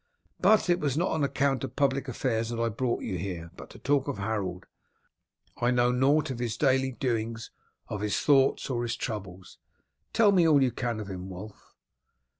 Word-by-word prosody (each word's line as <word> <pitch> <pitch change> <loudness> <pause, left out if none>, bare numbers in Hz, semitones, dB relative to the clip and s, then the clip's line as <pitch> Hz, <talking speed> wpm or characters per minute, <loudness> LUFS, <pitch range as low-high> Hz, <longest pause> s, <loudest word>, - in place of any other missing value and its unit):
But 215 -3 +4
it 175 0 +3
was 145 -3 -1
not 175 +3 +1
on 160 -2 0
account 140 -2 0
of 125 - -5
public 140 -1 +1
affairs 115 -2 -1
that 120 -1 -4
I 115 0 +1
brought 120 +2 -2
you 95 -5 -3
here, 85 -3 -5
but - - -11
to - - -13
talk 140 0 +1
of 140 - -3
Harold. 100 -3 -3 0.9
I 120 - +1
know 125 0 +3
nought 135 +4 +2
of 125 - -5
his 120 -2 -2
daily 130 -2 +2
doings, 115 -3 -3 0.4
of 105 - -5
his 105 -1 0
thoughts, 135 -2 +3
or 120 -2 -1
his 120 -1 -2
troubles. 95 -7 -6 0.5
Tell 220 -2 +5
me 180 -4 +4
all 145 -4 +5
you 130 - +2
can 120 -2 -3
of 105 - -6
him, 95 -1 -6
Wulf." 100 +3 -11
120 Hz, 195 wpm, -28 LUFS, 105-140 Hz, 0.9 s, Tell